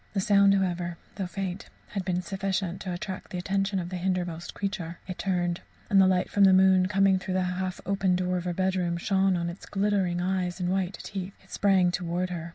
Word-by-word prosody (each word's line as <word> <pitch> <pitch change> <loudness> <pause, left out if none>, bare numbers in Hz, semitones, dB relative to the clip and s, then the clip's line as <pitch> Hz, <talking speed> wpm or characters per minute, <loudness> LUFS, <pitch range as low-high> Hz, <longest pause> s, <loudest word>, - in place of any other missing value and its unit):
The 200 - 0
sound, 200 0 +5
however, 175 -3 -1 0.2
though 190 -3 -3
faint, 190 0 -5 0.2
had 195 -2 -3
been 180 -1 -1
sufficient 190 -1 -2
to 185 - -4
attract 185 +1 -5
the 180 - -5
attention 195 +2 0
of 175 -2 -3
the 185 - -4
hindermost 175 -2 -2
creature. 190 -4 -4
It 185 - -6
turned, 175 -2 0 0.3
and 195 -1 +7
the 190 - +6
light 185 -1 +2
from 200 -1 +4
the 190 - +6
moon, 185 -1 +5
coming 195 -1 +3
through 185 0 -3
the 185 - +2
half 180 0 -3
open 195 -1 +1
door 180 0 0
of 175 - -4
her 180 - -1
bedroom, 185 -2 0
shone 190 +1 +2
on 170 0 -2
its 170 +2 -7
glittering 195 -3 0
eyes 180 0 -1
and 180 -1 -1
white 190 0 -1
teeth. 195 0 -6
It 190 - -22
sprang 190 -3 +3
towards 180 +1 -2
her. 170 -1 -5
185 Hz, 215 wpm, -27 LUFS, 180-195 Hz, 0.3 s, and